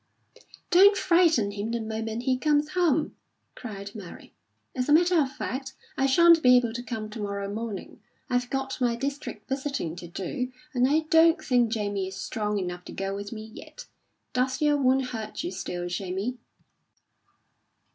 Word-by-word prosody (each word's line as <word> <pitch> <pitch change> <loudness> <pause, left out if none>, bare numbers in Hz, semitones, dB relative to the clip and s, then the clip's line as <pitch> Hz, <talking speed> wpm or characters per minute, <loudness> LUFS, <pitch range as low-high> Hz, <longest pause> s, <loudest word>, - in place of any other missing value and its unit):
"Don't 395 +3 +7
frighten 335 - +3
him 205 +2 -4
the 235 0 -1
moment 220 +1 -4
he 255 0 +2
comes 295 +2 +1
home," 330 -3 +1 0.4
cried 200 -4 -8
Mary. 195 -6 -11 0.4
"As 255 +1 -1
a - - +6
matter 345 +1 +5
of 265 -2 -1
fact, 265 0 -5 0.2
I 270 - +2
shan't 335 +4 +6
be 250 -2 +7
able 240 -2 0
to 240 - -4
come 225 -3 -5
to 220 - -7
morrow 200 -1 -3
morning; 220 -2 -6 0.3
I've 245 0 0
got 270 -1 -3
my 240 -1 +2
district 280 +4 -5
visiting 270 - -3
to 175 - -8
do, 250 - -4 0.2
and 250 0 +3
I 310 +2 +3
don't 330 +1 +6
think 245 -5 +2
Jamie 205 -4 -1
is 190 - -7
strong 210 +1 -2
enough 180 -2 -4
to - - -9
go 195 0 -3
with 200 0 -6
me 215 -2 -6
yet. - - -11 0.5
Does 255 +1 0
your 295 -1 +3
wound 265 -1 +2
hurt 220 +2 -5
you 350 - -3
still, 175 - -4
Jamie?" 190 +7 -3
245 Hz, 170 wpm, -27 LUFS, 205-280 Hz, 0.5 s, Don't